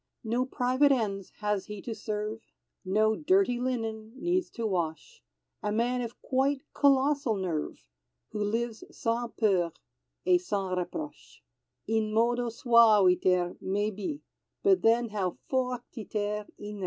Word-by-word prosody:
No 240 Hz, +3 st, 0 dB
private 260 Hz, +3 st, +3 dB
ends 200 Hz, -7 st, 0 dB
has 210 Hz, -2 st, 0 dB
he 210 Hz, -1 st, -6 dB
to 235 Hz, -, -4 dB
serve, 215 Hz, 0 st, -4 dB, 0.4 s
No 215 Hz, +3 st, +2 dB
dirty 315 Hz, -, +2 dB
linen 225 Hz, -3 st, -3 dB
needs 355 Hz, +3 st, 0 dB
to 230 Hz, -, -5 dB
wash; 170 Hz, -6 st, -3 dB, 0.4 s
A 210 Hz, -, -1 dB
man 240 Hz, +3 st, +1 dB
of 235 Hz, -1 st, -6 dB
quite 270 Hz, +1 st, +1 dB
colossal 275 Hz, -3 st, +3 dB
nerve, 175 Hz, -6 st, -3 dB, 0.5 s
Who 210 Hz, -, -2 dB
lives 225 Hz, +2 st, -2 dB
sans 235 Hz, +1 st, -2 dB
peur 185 Hz, -6 st, +2 dB, 0.5 s
et 360 Hz, -1 st, +4 dB
sans 195 Hz, -, -2 dB
reproche; 235 Hz, -, -6 dB, 0.4 s
In 220 Hz, -1 st, 0 dB
modo 240 Hz, +2 st, +2 dB
suaviter 200 Hz, -7 st, +4 dB
maybe, 205 Hz, +7 st, -2 dB, 0.4 s
But 390 Hz, -2 st, +4 dB
then 230 Hz, +1 st, +3 dB
how 195 Hz, -4 st, -2 dB
fortiter 225 Hz, -5 st, -2 dB
in 210 Hz, 0 st, -7 dB
re! -, -, -9 dB
225 Hz, 130 wpm, -29 LUFS, 205-250 Hz, 0.5 s, et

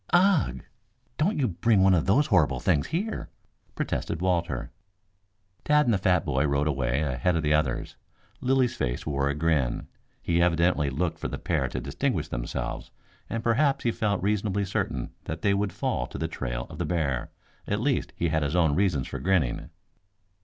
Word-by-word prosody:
"Ugh! 175 Hz, -, +3 dB, 0.6 s
Don't 190 Hz, +8 st, +2 dB
you 135 Hz, -4 st, +2 dB
bring 105 Hz, +1 st, +2 dB
one 95 Hz, 0 st, +6 dB
of 85 Hz, -1 st, +2 dB
those 130 Hz, +10 st, +4 dB
horrible 75 Hz, -, +3 dB
things 75 Hz, -1 st, +1 dB
here," 200 Hz, +8 st, -3 dB, 0.5 s
protested -, -, -2 dB
Walter. 90 Hz, -1 st, -1 dB, 0.9 s
Tad 150 Hz, 0 st, +4 dB
and 120 Hz, -, +3 dB
the 100 Hz, -, +1 dB
fat 90 Hz, -2 st, +2 dB
boy 70 Hz, -2 st, +1 dB
rode 70 Hz, +1 st, +1 dB
away 65 Hz, -1 st, 0 dB
ahead 70 Hz, +5 st, 0 dB
of 80 Hz, -, 0 dB
the 75 Hz, 0 st, +2 dB
others. 75 Hz, -5 st, -1 dB, 0.4 s
Lilly's 130 Hz, -1 st, +2 dB
face -, -, -2 dB
wore 70 Hz, -2 st, 0 dB
a 70 Hz, -, -1 dB
grin. 75 Hz, -6 st, 0 dB, 0.3 s
He 85 Hz, 0 st, +1 dB
evidently 85 Hz, -3 st, +2 dB
looked 80 Hz, +6 st, -2 dB
for -, -, -3 dB
the -, -, -4 dB
pair -, -, 0 dB
to -, -, -4 dB
distinguish -, -, -2 dB
themselves, -, -, -4 dB, 0.4 s
and 115 Hz, 0 st, -3 dB
perhaps 135 Hz, +5 st, +2 dB
he 120 Hz, -, +2 dB
felt 100 Hz, -4 st, -1 dB
reasonably 100 Hz, -1 st, 0 dB
certain 65 Hz, -9 st, -2 dB
that 80 Hz, +1 st, -5 dB
they 100 Hz, -, +3 dB
would 100 Hz, 0 st, 0 dB
fall -, -, -2 dB
to -, -, -8 dB
the -, -, -1 dB
trail -, -, -4 dB
of -, -, -9 dB
the 85 Hz, -, 0 dB
bear. 75 Hz, -6 st, -1 dB, 0.4 s
At 105 Hz, -, 0 dB
least, 135 Hz, +3 st, 0 dB
he 85 Hz, -, 0 dB
had 80 Hz, 0 st, +1 dB
his 75 Hz, +3 st, -1 dB
own 80 Hz, -4 st, +3 dB
reasons 85 Hz, -6 st, +1 dB
for -, -, -5 dB
grinning. 80 Hz, -4 st, 0 dB
85 Hz, 180 wpm, -27 LUFS, 70-105 Hz, 0.9 s, one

